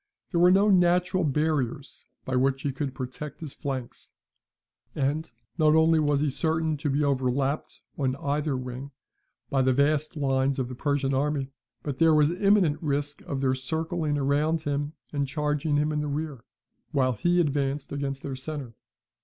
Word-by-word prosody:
There 170 - +1
were 175 +1 +7
no 195 +3 +5
natural 180 0 +3
barriers 145 -3 -1 0.2
by 130 - -2
which 135 +1 +1
he 140 - 0
could 135 0 -4
protect 130 +3 -6
his 155 -4 -7
flanks; 130 -3 -6 0.8
and 145 +4 -1 0.3
not 155 0 +5
only 160 0 +5
was 145 -2 +2
he 150 -2 +1
certain 160 +2 0
to 145 +1 -2
be 140 +2 +1
overlapped 135 +1 0 0.2
on 130 -2 +1
either 145 0 -1
wing 130 +2 -6 0.6
by 135 - +3
the 130 0 +3
vast 150 +3 +1
lines 135 -1 +1
of 130 -2 -2
the - - -6
Persian 140 +1 0
army, 140 0 0 0.3
but 140 -3 -4
there 160 -1 +5
was 150 +1 +4
imminent 190 -4 +3
risk 145 -1 -2
of 135 -1 -2
their 130 -1 +2
circling 160 +3 -2
round 145 +3 +1
him 145 +1 -2 0.2
and 140 -1 0
charging 150 +1 0
him 150 +1 +1
in 150 -1 -1
the 150 - -2
rear, 145 -4 -4 0.4
while 130 -2 +2
he 175 +10 +2
advanced 140 -3 0
against 140 -1 -3
their 135 - -4
centre. 135 -2 -6
145 Hz, 170 wpm, -27 LUFS, 135-155 Hz, 0.8 s, were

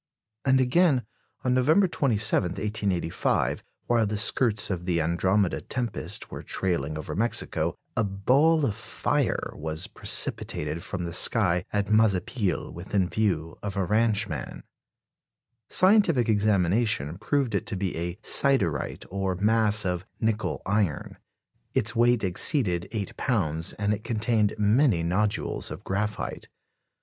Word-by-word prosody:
" 110 +3 -53
And 130 -1 +4
again, 130 - +3 0.4
on 125 - +1
November 155 +10 +4
27, 110 - +2
1885, 100 -5 -1 0.2
while 115 -2 +2
the 105 +1 -2
skirts 105 -1 +3
of 90 -1 -4
the 90 -2 0
Andromede 85 +4 0
tempest 125 -3 -3
were - - -6
trailing 75 -5 -2
over 75 - -6
Mexico, 115 +3 -1 0.2
"a 115 - +1
ball 135 +11 +2
of 110 - 0
fire" 110 -3 -1
was 80 +2 -4
precipitated 75 +2 -1
from 90 0 -5
the 85 -1 -5
sky 90 -2 +3
at 105 0 -1
Mazapil, 105 -1 +1
within 90 +1 -1
view 85 -7 -1
of 105 -1 -5
a 95 - +1
ranchman. 105 - -1 1.1
Scientific 185 - +4
examination 100 - +1
proved 130 +2 0
it 100 - -2
to - - -2
be 95 -1 -3
a 85 +1 -3
"siderite," 100 - 0
or 95 -1 -2
mass 105 +1 +3
of 90 -1 -2 0.2
"nickel 110 0 -1
iron"; 100 -6 -1 0.6
its 110 +3 +1
weight 120 0 +3
exceeded 95 - +2
eight 105 -3 -4
pounds, 80 - -1
and 105 0 -1
it 105 +1 -5
contained 110 -2 0
many 105 - +3
nodules 100 +5 -1
of - - -8
graphite. 105 +2 -3
105 Hz, 130 wpm, -26 LUFS, 90-115 Hz, 1.1 s, And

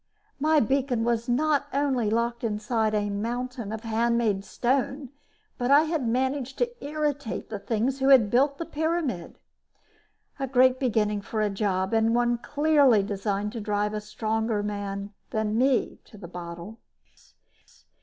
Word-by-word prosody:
My 310 +2 +4
beacon 260 -1 +1
was 235 0 0
not 290 +3 +2
only 265 -6 +1
locked 235 +2 -1
inside 215 0 0
a 205 -1 0
mountain 235 +2 -3
of 220 0 -5
handmade 225 -3 +1
stone, 265 +4 -1 0.5
but 245 0 0
I 285 +2 +7
had 315 -6 -1
managed 260 +2 -1
to 485 0 -2
irritate 290 -6 -3
the 210 - -4
things 235 +6 -1
who 270 +1 +2
had 245 -7 +6
built 280 +3 +3
the 335 - -4
pyramid. 315 - -2 1.0
A 270 - -1
great 255 0 +4
beginning 210 -5 +1
for 215 +1 -3
a 210 - 0
job 195 -1 -1
and 225 +1 +3
one 240 0 +2
clearly 290 -7 +3
designed 200 0 -2
to 230 -1 -5
drive 210 0 -1
a 210 - -3
stronger 220 0 -2
man 200 0 -4 0.2
than 220 -1 -1
me 255 +2 +1
to 215 - -15
the 190 -4 -9
bottle. 175 +5 -8
235 Hz, 150 wpm, -26 LUFS, 210-270 Hz, 1.0 s, I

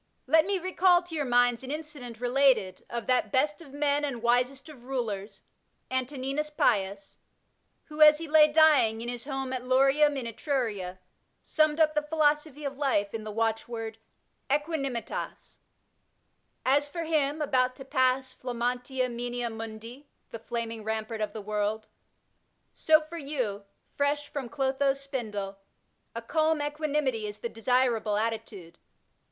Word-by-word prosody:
Let 320 +5 +4
me 400 -1 +1
recall 365 0 +3
to 350 -1 -11
your 295 -2 -1
minds 245 -1 +3
an 260 - -8
incident 290 -6 -6
related 245 -7 +2
of 235 -1 -4
that 255 -1 +1
best 295 +4 +1
of 290 -5 -13
men 290 0 +1
and 255 -5 -3
wisest 250 +4 +1
of 270 -6 -13
rulers, 225 -6 -4 0.5
Antoninus 270 +3 -2
Pius, 200 -8 0 0.6
who, 305 0 -7
as 300 0 +9
he 330 +1 -6
lay 305 0 +6
dying, 295 -8 +5
in 240 - -4
his 245 0 -5
home 270 -2 -3
at 255 -1 -3
Lorium 275 +3 +3
in 255 - -3
Etruria, 225 -7 -2 0.5
summed 310 0 +2
up 310 -1 +4
the 300 - +1
philosophy 300 -1 0
of 275 0 -5
life 205 -8 +1
in 225 -1 -4
the 215 - -6
watch 225 +1 -1
word, 225 -2 -6 0.5
Aeqfianimitas, 280 -4 -3 1.1
As 285 +2 +3
for 335 +3 -5
him, 305 -2 0
about 255 -4 +1
to 270 - -10
pass 260 -1 +1
pimmtxniia 250 +1 -2
moenia 240 0 -3
mundi 225 +5 -8 0.2
(the 230 - -6
flaming 230 -1 -4
rampart 220 0 -3
of 215 - -1
the 220 - -7
world), 210 +1 -2 0.9
so 315 0 +4
for 325 +2 -8
you, 250 -9 -3 0.3
fresh 290 +1 0
from 270 -5 -5
dotho's 275 0 0
spindle, 210 -8 -5 0.6
a 230 - -4
calm 315 +4 +1
equanimity 290 -6 -1
is 205 0 -7
the 235 - -4
desirable 230 -2 +1
attitude. 215 -6 -4
260 Hz, 145 wpm, -28 LUFS, 230-295 Hz, 1.1 s, as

